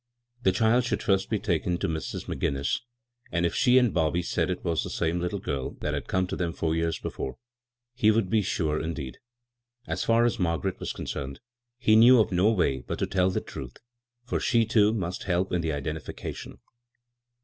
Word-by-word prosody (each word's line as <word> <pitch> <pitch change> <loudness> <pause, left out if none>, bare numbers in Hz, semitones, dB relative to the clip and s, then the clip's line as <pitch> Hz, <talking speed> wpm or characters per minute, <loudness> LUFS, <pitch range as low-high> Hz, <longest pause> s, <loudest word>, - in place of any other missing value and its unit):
The 95 - +4
child 110 +6 +3
should 120 - -2 0.3
be 110 - +1
taken 90 -3 0
first 85 - -3
to - - +1
Mrs. 80 -2 -4
McGinnis, 70 0 -1 0.5
and 85 0 +1
if 85 - 0
she 125 -1 +4
and 125 -4 +4
Bobby 85 +1 +1
said - - 0
it 90 0 -3
was 85 -2 +1
the - - -5
same 85 +2 -1
little 90 +3 -2
girl 70 -8 -4
that - - -1
had - - -4
come 95 0 +1
to 90 - -4
them 85 -2 -2
four 80 0 -1
years 80 0 0
before, 65 - -5 0.7
be 110 - +6
would 110 -2 +3
be 110 +3 +2
sure 80 -5 -1
indeed. 75 -5 -5 0.7
As - - -2
far 115 +1 +4
as 120 -1 0
Margaret 85 -5 -1
was - - -3
concerned, 70 0 -5 0.4
he 110 -3 +4
knew 120 +3 +8
(rf 110 - +3
no 95 +4 +4
way 80 -11 +1
but - - -5
to - - 0
tell 95 -1 +2
her 95 - -4
the - - +1
truth, 65 -2 -8 0.5
for 125 - -2
she, 115 -3 +3
too, 110 -1 +4
must 90 -5 -3
help 90 0 0
in 90 - +1
the 80 - -2
idendficatioQ. 75 +1 -5
90 Hz, 205 wpm, -27 LUFS, 80-110 Hz, 0.7 s, knew